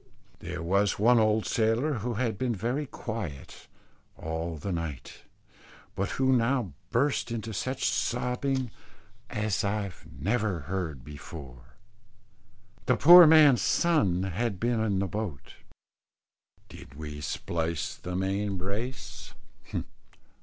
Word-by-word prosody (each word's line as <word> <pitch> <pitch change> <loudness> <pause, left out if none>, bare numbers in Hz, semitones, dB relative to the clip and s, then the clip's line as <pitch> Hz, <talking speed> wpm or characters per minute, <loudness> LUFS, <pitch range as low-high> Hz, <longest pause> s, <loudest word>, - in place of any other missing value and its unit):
There - - -6
was 100 +4 +2
one 120 +3 +5
old 110 0 +2
sailor 115 +5 +1
who 120 +3 -3
had 115 -3 -1
been 125 -3 0
very 125 +9 -2
quiet 105 - -7 0.5
all 80 +1 -4
the 95 +7 -4
night, 80 -6 -5 0.7
but 95 +2 -2
who 130 0 +3
now 120 - +1 0.2
burst 135 +1 +1
into 115 -1 -4
such 130 +6 -2
sobbing 125 +1 -1 0.6
as 105 -2 -1
I 100 -1 -1 0.2
never 100 - -1
heard 80 -5 -4
before. 65 -4 -11 1.1
The 125 - +3
poor 175 +2 +10
man's 150 -6 +7
son 105 - +2
had 95 +2 -2
been 120 -1 +1
in 100 -3 0
the 95 0 0
boat. 100 -8 -5 1.1
Did 70 - -13
we 75 -1 -7
splice 80 +2 -2
the 90 0 -6
main 95 +1 -1
brace? 105 +8 -5
105 Hz, 115 wpm, -28 LUFS, 85-120 Hz, 1.1 s, poor